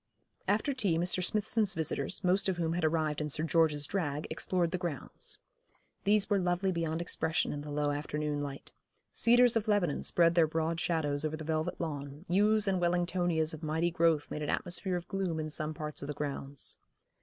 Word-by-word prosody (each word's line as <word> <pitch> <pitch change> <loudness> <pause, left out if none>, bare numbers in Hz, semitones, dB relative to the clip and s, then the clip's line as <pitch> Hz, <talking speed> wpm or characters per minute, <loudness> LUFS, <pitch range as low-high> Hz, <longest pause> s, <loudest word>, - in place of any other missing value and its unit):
After 215 +8 +1
tea 200 -10 +1
Mr. 180 +2 +2
Smithson's 215 +1 +1
visitors, 155 -4 -1
most 190 +2 +2
of 185 - -1
whom 165 -1 0
had 175 -1 -2
arrived 155 -1 +1
in 150 - -2
Sir 155 +2 +1
George's 160 -3 +2
drag, 150 -6 -2
explored 175 -3 0
the 185 - -2
grounds. 170 -8 -4 0.7
These 205 0 +3
were 205 -2 +2
lovely 180 +1 +1
beyond 165 -1 -1
expression 160 -1 0
in 145 - -5
the 150 - -8
low 145 0 0
afternoon 150 0 -2
light. 140 -1 -6 0.4
Cedars 240 0 +5
of 220 -1 0
Lebanon 200 -8 +1
spread 170 -1 +3
their 170 -2 +4
broad 160 +1 -1
shadows 150 -4 0
on 155 0 -1
the 155 - -7
velvet 155 0 -2
lawn, 145 -1 -5
yews 210 +3 +3
and 190 -2 +1
Wellingtonias 175 -2 +1
of 160 - -8
mighty 160 +2 0
growth 165 -3 +2
made 150 - -4
an 150 - -3
atmosphere 180 +1 -1
of 175 -1 -4
gloom 190 -5 -2
in 155 0 -3
some 155 +1 -2
parts 150 0 -5
of 140 - -5
the 150 - -4
grounds. 140 -1 -4
165 Hz, 190 wpm, -31 LUFS, 150-185 Hz, 0.7 s, Cedars